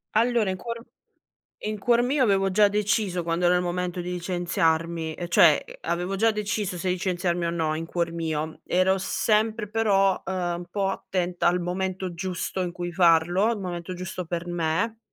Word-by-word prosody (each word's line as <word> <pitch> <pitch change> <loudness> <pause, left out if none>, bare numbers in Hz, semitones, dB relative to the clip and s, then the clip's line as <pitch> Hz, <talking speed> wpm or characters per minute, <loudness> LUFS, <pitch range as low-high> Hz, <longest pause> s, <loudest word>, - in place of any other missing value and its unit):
Allora 230 -2 +3
in 185 - -2
cuor 230 +4 -6 0.8
in 215 0 -3
cuor 235 +3 +3
mio 260 +3 +2
avevo 195 -4 +3
già 205 +2 +5
deciso 205 -3 0
quando 170 +1 -1
era 175 +1 +5
il - - +1
momento 180 0 -2
di 175 +1 -4
licenziarmi 170 -2 0
e 175 +2 -5
cioè 170 - +6 0.2
avevo 180 - -2
già 225 +3 +3
deciso 210 -3 -2
se 185 +2 -3
licenziarmi 180 -1 0
o 170 - 0
no 160 -2 -1
in 165 +1 -4
cuor 170 0 -2
mio, 160 -1 -3
ero 185 +1 +2
sempre 215 +2 0
però, 200 -3 +2
ehm, 190 - -3 0.3
un 175 - -8
po' 195 0 0
attenta 180 -2 -1
al 180 +1 +2
momento 185 +1 -3
giusto 185 +1 -3
in 180 -1 -2
cui 175 0 -5
farlo, 175 +4 +4
il 225 - -3
momento 180 -1 -5
giusto 185 +1 -5
per 170 +1 -4
me, 175 +7 -1
180 Hz, 180 wpm, -25 LUFS, 175-205 Hz, 0.8 s, cioè